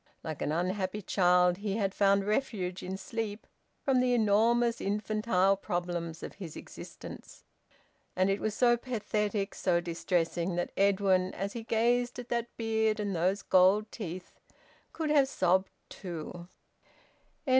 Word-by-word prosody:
Like 155 -2 -5
an - - 0
unhappy 185 +4 -1
child, 180 -1 +3
he 200 0 -2
had 195 -3 0
found 200 -1 +3
refuge 205 -5 -1
in 190 +1 -4
sleep 215 +1 -5 0.4
from 270 -3 +3
the 250 -1 +3
enormous, 230 +2 +3
infantile 200 -1 +1
problems 175 -3 -4
of - - -6
his 175 -6 -8
existence. - - -10 0.7
And 185 +1 +3
it 195 +1 +1
was 215 -1 -2
so 240 0 +4
pathetic, 210 -4 -2
so 175 -2 +1
distressing, 170 0 -1
that 175 - -2
Edwin, 190 -2 +2
as 200 +2 -3
he 235 - -5
gazed 240 +2 +1
at 245 -1 -7
that 235 -1 -1
beard 220 -1 +1
and 205 -2 -2
those 185 +4 +1
gold 195 +3 +4
teeth, 180 -4 -7 0.5
could 315 -2 -2
have 285 -3 +5
sobbed 190 -4 +2 0.2
too. 175 -1 -7
200 Hz, 140 wpm, -30 LUFS, 180-220 Hz, 0.7 s, have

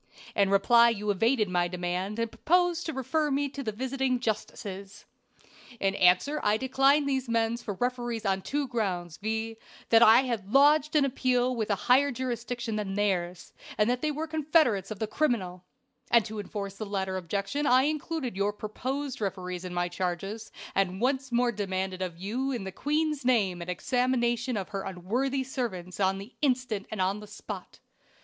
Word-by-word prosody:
In 200 -1 +3
reply 235 +4 +6
you 210 -2 -1
evaded 225 +3 +2
my 175 -1 +1
demand, 180 +3 -3
and 230 -1 -1
proposed 350 +7 +1
to - - -1
refer 300 +4 0
me 285 +1 +1
to 280 +1 -6
the 225 -5 -2
visiting 260 +2 -1
justices. 200 -3 -5 0.7
"In 195 0 +1
answer 185 +12 +3
I 210 +1 +2
declined 270 +3 +3
these 265 -3 -1
men 230 0 +1
for 225 -4 -5
referees 240 0 -2
on 195 -1 +1
two 285 +7 -2
grounds, 180 -9 -2
viz., 220 +2 -3 0.3
that 225 0 +6
I 230 +2 +8
had 230 -6 -3
lodged 295 +3 +5
an 290 -2 +5
appeal 255 -1 +1
with 220 -2 -2
a 205 - +3
higher 275 +3 +5
jurisdiction 240 -2 -3
than 195 -2 -3
theirs, 185 -4 -1 0.2
and 210 - +3
that 250 - -1
they 310 - +1
were 305 +2 -2
confederates 305 - +2
of 215 - -5
the 220 - -1
criminal; 195 -10 -1 0.4
and 235 -2 +5
to 215 -1 -6
enforce 200 -1 -5
the 215 - -4
latter 190 -2 -2
objection 200 - -2
I 255 +1 +5
included 300 - -2
your 200 +1 0
proposed 260 +6 -4
referees 180 -2 -3
in 180 - -5
my 175 0 +1
charges, 190 +5 -4 0.2
and 190 -1 0
once 265 +2 0
more 240 0 +2
demanded 190 -3 -3
of 180 -3 -3
you 235 +9 -2
in 240 -6 -3
the 190 - -5
queen's 300 +4 -1
name 205 -8 +2
an 170 - -6
examination 245 - 0
of 195 - -4
her 195 -1 -3
unworthy 240 +10 -1
servants 215 -10 -4
on 195 0 +2
the 200 +6 -9
instant 250 -7 0
and 215 - -5
on 190 +2 +1
the 210 - -10
spot. - - -8
225 Hz, 180 wpm, -28 LUFS, 195-260 Hz, 0.7 s, I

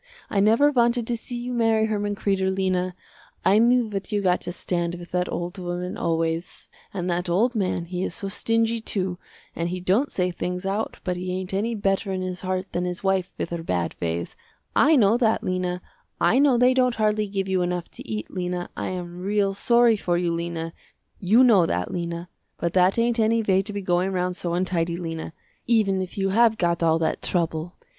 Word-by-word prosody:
I 200 - +1
never 225 +9 +5
wanted 240 -2 +2
to 240 - -1
see 240 +2 -7
you 245 +1 -4
marry 225 -2 +3
Herman 205 -1 -1
Kreder, 195 -2 0
Lena, 185 -1 0 0.5
I 205 - +5
knew 240 +1 +4
what 200 -1 -5
you 205 -1 0
got 180 -1 +2
to - - -5
stand 175 -1 -2
with 175 0 -10
that 180 0 -1
old 175 +2 -4
woman 180 0 -4
always, 165 +1 -2 0.2
and 180 -2 -3
that 175 0 -1
old 230 +8 +2
man, 185 -4 -1
he 180 +1 -3
is - - -3
so 200 - -5
stingy 225 +3 +1
too 185 -4 -2 0.4
and 170 +1 -2
he 180 +1 -3
don't 195 +10 +1
say 180 -1 0
things 180 +1 -4
out 200 +3 -2
but 180 -1 -2
he 180 0 -4
ain't 185 +1 -4
any 225 +4 0
better 195 0 0
in 185 -1 -2
his 185 -1 -4
heart 185 0 -3
than 175 - -1
his 180 +1 -4
wife 190 -1 +1
with - - -3
her 170 -1 -3
bad 90 - -2
ways, 85 0 -3 0.4
I 310 +2 +5
know 225 -3 +4
that 225 -3 +2
Lena, 180 -1 -2 0.4
I 255 - +4
know 275 -3 +5
they 250 +1 +5
don't 250 -2 +2
hardly 215 -1 +1
give 195 -1 -2
you 190 -1 +1
enough 175 -1 -2
to - - -11
eat, 105 -1 -4
Lena, 180 -1 -3
I - - -3
am 175 -1 -5
real 200 +1 +1
sorry 235 +2 +4
for 175 -3 0
you 175 -1 0
Lena, 170 -1 -3 0.5
you 215 +7 +5
know 205 -9 +5
that 90 +1 -2
Lena, 170 0 -4 0.3
but 170 0 -2
that 185 +2 +4
ain't 235 0 +2
any 225 +1 +3
way 190 -2 +3
to 205 +2 -4
be 200 -1 -4
going 180 +1 +1
round 180 -1 -1
so 175 -1 -2
untidy 175 -2 0
Lena, 165 -2 -5 0.4
even 210 -5 +2
if 185 +1 -6
you 195 -1 +1
have 225 +2 +4
got 170 -2 0
all 165 -1 +3
that 165 - -1
trouble. 170 -1 -1
185 Hz, 210 wpm, -24 LUFS, 175-215 Hz, 0.5 s, never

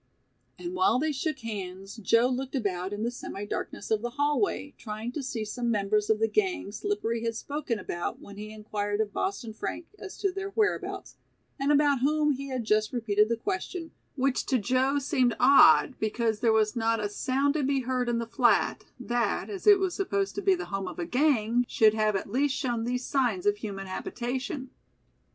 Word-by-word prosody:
And 350 0 -6
while 370 -4 +3
they 310 +4 0
shook 285 0 -3
hands 195 -2 -6
Joe 230 +3 +3
looked 260 +2 -3
about 190 -6 -2
in 205 +1 -3
the 235 - 0
semi 205 -4 -6
darkness 205 - -5
of 215 -1 +2
the 240 - -2
hallway 290 +2 0
trying 220 +1 -5
to 290 - -4
see 245 -5 -3
some 240 +3 -2
members 210 -1 +1
of 220 - +4
the 225 +1 +2
gang 350 - 0
Slippery 235 - -2
had 230 -1 -1
spoken 280 -2 -3
about 175 -3 -4
when 200 - -12
he 210 +1 -7
inquired 210 -1 -3
of 210 -2 -1
Boston 260 - -3
Frank 330 +9 -5
as 390 - -8
to 395 - 0
their 390 +1 -4
whereabouts, 420 +1 -1 0.4
and 275 +2 +2
about 290 -2 +4
whom 300 +3 +2
he 275 0 -4
had 255 -3 -3
just 215 0 +2
repeated 215 -3 +2
the 230 - 0
question, 320 - -4 0.2
which 270 -1 +1
to 260 - +3
Joe 255 +5 +1
seemed 260 -4 +1
odd 280 +2 +7
because 220 0 0
there 230 0 +3
was 215 -1 +2
not 225 -1 +1
a 210 - -1
sound 270 +7 0
to 305 - 0
be 275 0 +1
heard 250 -1 -1
in 235 - +1
the 230 - -2
flat, 235 +1 +2
that, 240 - -1
as 395 0 -6
it 410 -1 +9
was 380 -2 -1
supposed 395 0 -1
to 400 - -3
be 390 -1 +4
the 370 - -5
home 195 -1 -2
of - - -7
a 175 - -2
"gang", 245 - +2
should 215 -1 +4
have 215 -1 +1
at 195 - -3
least 275 +3 +1
shown 240 -5 -1
these 250 +1 -2
signs 245 -10 0
of 205 0 +3
human 200 -2 -5
habitation. 255 +7 -4
245 Hz, 200 wpm, -28 LUFS, 215-285 Hz, 0.4 s, it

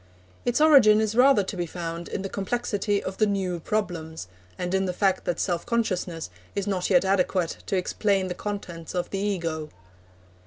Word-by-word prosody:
Its 245 +2 +1
origin 270 -9 +7
is 220 -1 0
rather 250 -2 +5
to 190 - -5
be 175 -2 -2
found 170 0 -5
in 195 - -4
the - - -2
complexity 205 0 -1
of 190 - -5
the 215 - +3
new 190 -3 -1
problems, 160 - -3 0.3
and 180 0 -3
in 190 0 +2
the 180 - -2
fact 190 0 +1
that 175 - -1
self 175 -3 0
consciousness 185 - -2 0.2
is 200 - -1
not 190 -3 -1
yet 185 -1 +4
adequate 185 -2 +1
to 195 - 0
explain 195 +1 +1
the 180 - -3
contents 180 -5 -6
of 180 - -2
the 195 - -2
Ego. 165 -6 -2
190 Hz, 185 wpm, -26 LUFS, 175-205 Hz, 0.3 s, origin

